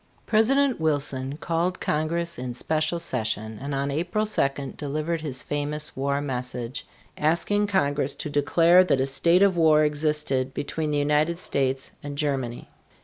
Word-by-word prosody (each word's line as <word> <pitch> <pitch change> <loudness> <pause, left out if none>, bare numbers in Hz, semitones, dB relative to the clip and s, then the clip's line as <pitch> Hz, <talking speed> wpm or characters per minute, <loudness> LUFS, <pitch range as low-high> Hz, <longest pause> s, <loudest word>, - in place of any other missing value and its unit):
President 255 +3 +3
Wilson 140 -3 0
called 170 +3 -1
Congress 170 +2 -1
in 125 -1 -5
special 155 +5 0
session 110 -7 -2
and 140 0 -3
on 140 +1 -1
April 175 +8 -1
2 140 -9 0
delivered 155 +3 -3
his 135 -4 -3
famous 150 +1 -3
war 140 +1 0
message, 125 -2 -4 0.3
asking 170 +7 +1
Congress 145 -8 +1
to - - -5
declare 165 +5 +4
that 160 -7 +1
a 130 - +2
state 170 +7 +3
of 195 -2 +4
war 155 -2 +5
existed 150 -3 -1
between 155 +1 -3
the 150 - 0
United 150 +3 +1
States 135 -5 -2
and 145 -1 -7
Germany. 135 -5 -2
150 Hz, 145 wpm, -25 LUFS, 135-170 Hz, 0.3 s, war